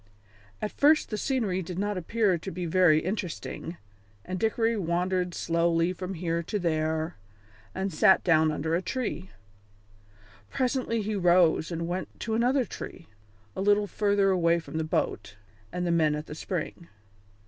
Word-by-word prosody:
At 210 - -1
first 300 -1 +3
the - - -1
scenery 210 -8 0
did 180 0 -6
not 205 +1 -1
appear 195 +2 +1
to 165 - -6
be 180 +1 -4
very 165 -2 +4
interesting, 180 -2 -4 0.5
and 185 0 -4
Dickory 225 +1 +1
wandered 180 -1 -1
slowly 170 +1 +1
from 185 +1 -5
here 170 0 -1
to 190 +5 -3
there, 160 -2 -1 0.6
then 190 +1 -2
sat 185 +4 +5
down 160 -2 +4
under 160 +2 -2
a 170 - +2
tree. 215 -2 -3 1.2
Presently 250 -4 -1
he 215 +2 -2
rose 175 -3 +3
and 170 0 -3
went 180 +2 -5
to 225 - -2
another 250 +3 +2
tree, 170 - -9 0.5
a - - -3
little 205 +1 +3
farther 200 -1 +2
away 170 -2 +3
from 160 -1 -5
the - - 0
boat 100 -9 -2 0.4
and 180 0 -2
the 175 - +1
men 155 -3 +3
at 150 +1 -5
the - - -8
spring. 170 +1 -5
180 Hz, 160 wpm, -28 LUFS, 165-205 Hz, 1.2 s, sat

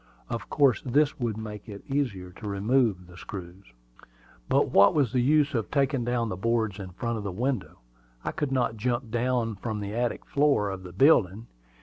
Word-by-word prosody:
Of 115 -1 -4
course 140 -5 +3
this 145 +4 +2
would 115 -4 -2
make 105 0 -7
it 100 -1 -9
easier 120 -11 -2
to 105 +4 -9
remove 100 -1 +1
the 90 0 -15
screws. 95 0 -9 0.8
But - - +2
what 100 +7 +6
was 140 -6 +2
the 125 - +2
use 150 +3 +3
of 115 -4 -1
taking 135 -2 +1
down 120 -1 0
the 95 - -3
boards 110 0 0
in 95 -2 -6
front 115 +5 -3
of - - -6
the 100 - -3
window? 120 +3 -2 0.5
I - - -1
could 145 -2 -3
not 120 -4 0
jump 120 +1 -2
down 120 -3 0
from 110 +1 -4
the 100 0 -5
attic 120 +1 -2
floor 140 -9 +2
of 95 -1 -6
the 90 -1 -10
building. 110 - +4
115 Hz, 195 wpm, -27 LUFS, 100-130 Hz, 0.8 s, what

